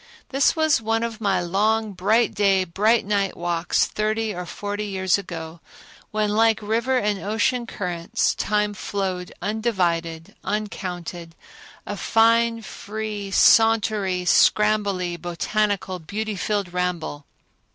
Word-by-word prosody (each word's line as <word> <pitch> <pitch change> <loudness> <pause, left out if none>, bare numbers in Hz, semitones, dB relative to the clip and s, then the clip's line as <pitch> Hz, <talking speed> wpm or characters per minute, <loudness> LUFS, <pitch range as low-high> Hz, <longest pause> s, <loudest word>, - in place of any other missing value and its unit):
This 275 +2 +2
was 315 -5 +2
one 225 +1 0
of 230 -1 -4
my 195 -3 +2
long, 210 +5 +1
bright 210 +5 +2
day 195 -2 +3
and 170 -2 -14
bright 215 +4 +3
night 200 -1 0
walks 170 0 +1
thirty 215 0 -1
or 180 -1 -6
forty 205 +3 -4
years 190 -1 +1
ago 165 -3 -7 0.5
when, 215 -1 0
like 225 +1 +3
river 230 +5 0
and 210 -4 0
ocean 230 +4 0
currents, 175 -5 -1
time 210 0 0
flowed 190 -3 -3
undivided, 175 -7 -1
uncounted—a 180 -2 -6
fine 230 +1 +3
free, 210 -1 -6
sauntery, 210 -3 +3
scrambly, 200 -4 +2
botanical, 190 +2 -1
beauty 210 +6 -4
filled 195 -1 -2
ramble. 175 -5 -3
205 Hz, 120 wpm, -23 LUFS, 180-220 Hz, 0.5 s, day